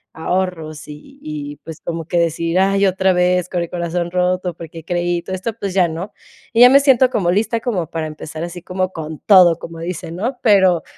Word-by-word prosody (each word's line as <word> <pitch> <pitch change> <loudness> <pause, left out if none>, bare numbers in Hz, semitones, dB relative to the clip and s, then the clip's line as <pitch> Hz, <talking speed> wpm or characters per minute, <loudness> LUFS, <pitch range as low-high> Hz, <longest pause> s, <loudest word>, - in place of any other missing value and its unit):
ahorros 160 -2 -3
y 150 - -12
y 150 -1 -6
y, - - -14
pues, 160 +2 -11
como 165 -2 -5
que 175 - 0
decir: 165 +1 0
"Ay, 195 +1 +3
otra 190 0 +2
vez 180 0 +1
con 175 -2 -2
el 170 - -7
corazón 170 0 -3
roto 180 0 0
porque 165 -1 -10
creí 175 0 -1
y - - -4
todo 190 - -4
esto", 215 +5 -4
pues 200 -4 -5
ya 180 -3 +4
no. 170 +6 -6 0.4
Y 230 - +4
ya 250 - +10
me 275 +2 +7
siento 260 -2 +4
como 185 -7 +1
lista 225 +4 0
como 185 - -2
para 160 -1 -3
empezar 155 +1 -7
así 175 0 -7
como 185 0 -2
con 155 -1 -6
todo, 180 -5 +6
como 165 -1 -9
dicen, 170 0 -6
¿no? 245 +6 -2
Pero 190 -6 +4
180 Hz, 220 wpm, -18 LUFS, 165-190 Hz, 0.4 s, ya